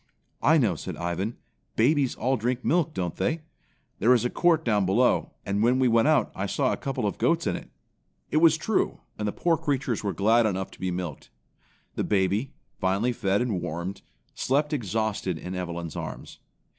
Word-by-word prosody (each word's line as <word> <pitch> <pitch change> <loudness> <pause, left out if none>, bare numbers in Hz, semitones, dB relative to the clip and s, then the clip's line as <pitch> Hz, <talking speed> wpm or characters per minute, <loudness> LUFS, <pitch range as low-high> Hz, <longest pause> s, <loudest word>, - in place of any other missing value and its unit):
"I 160 +2 +5
know," 115 - +3
said - - -6
Ivan. 90 +6 -3 0.4
"Babies 135 +3 +3
all 130 +2 +1
drink 125 +2 -2
milk, 170 -1 +2
don't 90 -3 -2
they? 160 - 0 0.6
There 120 +5 +5
is 120 - +1
a 125 - 0
court 175 -3 +2
down 105 -4 +2
below, 100 +7 +2
and 100 +1 0
when 120 +3 +4
we 130 -1 +3
went 115 +2 +4
out 150 -7 +3
I 100 +1 -3
saw 135 +5 +1
a - - -3
couple 135 -5 -3
of 100 - -2
goats - - +2
in - - 0
it." - - -8 0.6
It - - +2
was 160 0 +6
true, 210 +6 0 0.2
and 105 - -1
the - - 0
poor 170 +6 +1
creatures 135 -8 -1
were 100 - 0
glad 110 +3 +4
enough 95 -2 -2
to - - -15
be 95 - -1
milked. 90 -4 -5 0.6
The - - -2
baby, 100 +5 +1 0.3
finally 100 +6 +1
fed 100 0 +1
and 105 -8 -1
warmed, 85 +5 -4 0.3
slept 145 +3 0
exhausted 110 - -1
in 90 +3 -6
Evelyn's 85 -3 -4
arms. - - -7
110 Hz, 190 wpm, -26 LUFS, 95-135 Hz, 0.6 s, was